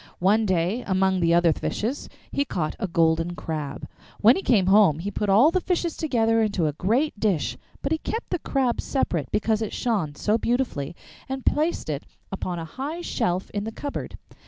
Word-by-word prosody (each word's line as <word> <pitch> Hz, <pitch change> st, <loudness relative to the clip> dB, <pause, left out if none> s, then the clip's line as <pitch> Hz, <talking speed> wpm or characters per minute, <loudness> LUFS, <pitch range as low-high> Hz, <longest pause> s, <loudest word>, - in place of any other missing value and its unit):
One 210 Hz, +4 st, +3 dB
day, 185 Hz, +6 st, 0 dB
among 190 Hz, -1 st, +2 dB
the 170 Hz, -1 st, +3 dB
other 170 Hz, -2 st, +4 dB
fishes, 235 Hz, -, -3 dB, 0.2 s
he 280 Hz, -, +1 dB
caught 170 Hz, -, -3 dB
a 195 Hz, -, -1 dB
golden 165 Hz, 0 st, +1 dB
crab. 150 Hz, -5 st, -5 dB, 0.3 s
When 230 Hz, +5 st, +7 dB
he -, -, -2 dB
came 215 Hz, -, +3 dB
home 190 Hz, -5 st, +5 dB
he 190 Hz, +5 st, -4 dB
put 205 Hz, 0 st, -2 dB
all 230 Hz, +11 st, +6 dB
the 370 Hz, -, +1 dB
fishes 345 Hz, -2 st, -1 dB
together 225 Hz, -7 st, +2 dB
into 200 Hz, -6 st, +1 dB
a 150 Hz, -, 0 dB
great 225 Hz, -, 0 dB
dish, 150 Hz, -, 0 dB, 0.3 s
but 275 Hz, -, -1 dB
he 320 Hz, -, +1 dB
kept 455 Hz, -, -4 dB
the 360 Hz, -, 0 dB
Crab 260 Hz, -5 st, 0 dB
separate 175 Hz, -, -1 dB
because 220 Hz, 0 st, +1 dB
it 220 Hz, -, -3 dB
shone 195 Hz, -12 st, -1 dB
so 215 Hz, +8 st, +1 dB
beautifully, 235 Hz, -, -1 dB, 0.3 s
and 265 Hz, -1 st, -4 dB
placed 315 Hz, +3 st, +1 dB
it 150 Hz, -2 st, -4 dB, 0.2 s
upon 185 Hz, -2 st, -3 dB
a 165 Hz, -, -4 dB
high 285 Hz, -, -5 dB
shelf 180 Hz, -, -1 dB
in 205 Hz, 0 st, -2 dB
the 225 Hz, -, -4 dB
cupboard. 285 Hz, +5 st, -5 dB
205 Hz, 190 wpm, -25 LUFS, 170-255 Hz, 0.3 s, When